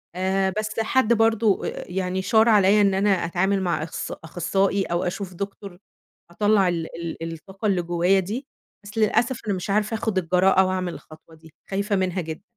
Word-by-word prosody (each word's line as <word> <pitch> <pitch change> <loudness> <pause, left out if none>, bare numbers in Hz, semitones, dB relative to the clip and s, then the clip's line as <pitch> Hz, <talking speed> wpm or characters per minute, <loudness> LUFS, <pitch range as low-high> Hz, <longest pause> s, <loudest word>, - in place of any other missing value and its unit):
آآ، 190 +1 0
بس 215 +1 -3
حد 230 +1 +2
برضو 225 -2 +2
آآ - - -5
يعني 185 0 -2
شار 220 +4 +4
عليَّ 205 0 +5
إن 200 -1 +3
أنا 200 +2 +2
أتعامل 190 +1 +1
مع 170 -4 -1
أخص 165 - -5
أخصائي 195 +4 -1
أو 175 0 -2
أشوف 185 +1 -4
دكتور، 200 0 -7 0.5
أطلّع 205 0 +3
ال 170 -2 -1 0.4
ال 165 0 -4
الطاقة 190 +5 -9
اللي 190 -4 +2
جوايا 175 +3 +2
دي، 220 +9 -4 0.4
بس 205 +2 -11
للأسف 235 +3 +2
أنا 205 - +1
مش 180 +1 -6
عارفة 210 +2 +1
آخد 220 -2 -2
الجراءة، 185 +2 +3
وأعمل 185 -1 -2
الخطوة 160 +1 -14
دي، 160 -1 -18 0.2
خايفة 200 +1 -1
منها 185 -1 -1
جدًا. 160 +3 -7
190 Hz, 175 wpm, -23 LUFS, 175-205 Hz, 0.5 s, عليَّ